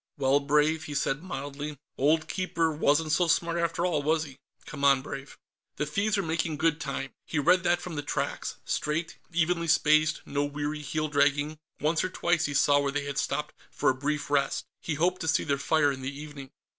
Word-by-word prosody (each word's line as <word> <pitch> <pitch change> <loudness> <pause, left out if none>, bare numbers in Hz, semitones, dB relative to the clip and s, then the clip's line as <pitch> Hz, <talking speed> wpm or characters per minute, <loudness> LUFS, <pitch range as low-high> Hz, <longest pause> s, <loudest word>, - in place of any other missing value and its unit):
"Well, 140 0 +3
Brave," 150 +3 +2
he 145 - -6
said 140 +1 0
mildly. 145 -3 -5 0.2
"Old 160 +4 +2
Keeper 170 -3 0
wasn't 155 +1 +2
so 170 +4 +3
smart, 170 +1 +1
after 170 +1 0
all, 170 -5 +1
was 155 +2 +1
he? 140 -3 -11 0.3
Come 140 -2 -7
on, 135 -2 +5
Brave." 135 0 -8 0.4
The 150 - -1
thieves 200 +8 0
were 200 - 0
making 160 -1 -1
good 160 0 +1
time. 140 -1 -4 0.2
He 165 - -3
read 180 +5 +4
that 175 0 +2
from 180 - -6
the 145 - -2
tracks 145 - -3
straight, 160 +3 -2
evenly 170 0 +1
spaced, 155 -1 +3
no 145 0 -1
weary 145 +1 -3
heel 155 +1 -2
dragging. 145 +1 +1 0.2
Once 155 +2 +1
or 185 - -1
twice, 175 -2 +1
he 145 - -3
saw 145 +1 +5
where 140 -1 0
they 145 0 -2
had 140 0 -2
stopped 150 - -2 0.2
for - - +2
a - - -2
brief 145 +2 -3
rest. 140 -1 +1 0.2
He 160 - -2
hoped 180 +4 +1
to 160 - -3
see 160 - +2
their 140 -2 0
fire 145 0 +3
in 130 -1 -6
the 135 +2 -5
evening. 145 -3 -9
150 Hz, 205 wpm, -28 LUFS, 145-165 Hz, 0.4 s, on